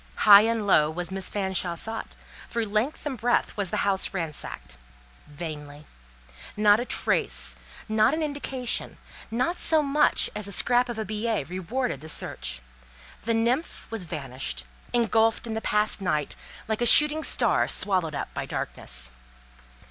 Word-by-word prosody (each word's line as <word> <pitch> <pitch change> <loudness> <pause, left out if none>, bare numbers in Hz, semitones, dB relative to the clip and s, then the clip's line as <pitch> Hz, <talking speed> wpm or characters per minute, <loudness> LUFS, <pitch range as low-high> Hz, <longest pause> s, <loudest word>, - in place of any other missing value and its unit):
High 205 -1 +10
and 225 -2 -1
low 155 -6 +4
was 175 +3 -4
Miss 190 -1 -3
Fanshawe 190 -3 0
sought; 225 +6 -5 0.3
through 230 -1 -1
length 215 +10 -2
and 285 -3 -2
breadth 240 +3 +1
was 200 -3 -1
the - - -1
house 195 0 0
ransacked; 150 - -5 0.5
vainly; 150 -1 -8 0.7
not 210 0 +5
a 240 - -2
trace, - - -1 0.3
not 220 +5 +3
an 320 - -2
indication, 270 -4 -3 0.3
not 255 +10 -1
so 315 -2 +4
much 295 +1 +3
as 210 -1 -2
a - - -4
scrap 245 +5 +2
of 240 - -4
a 220 - -3
billet 215 -6 -2
rewarded 185 - -3
the 155 - -8
search; - - -3 0.6
the 230 - +1
nymph 240 +8 -1
was 220 -5 +1
vanished, 130 - -4 0.3
engulfed 225 -1 +2
in 225 - -4
the 220 - -3
past 210 -1 +2
night, 155 -6 -1 0.3
like 220 +1 -2
a 240 - +3
shooting 300 +5 +6
star - - +2
swallowed 180 -6 0
up - - -5
by - - -4
darkness. - - -2
210 Hz, 155 wpm, -26 LUFS, 170-235 Hz, 0.7 s, High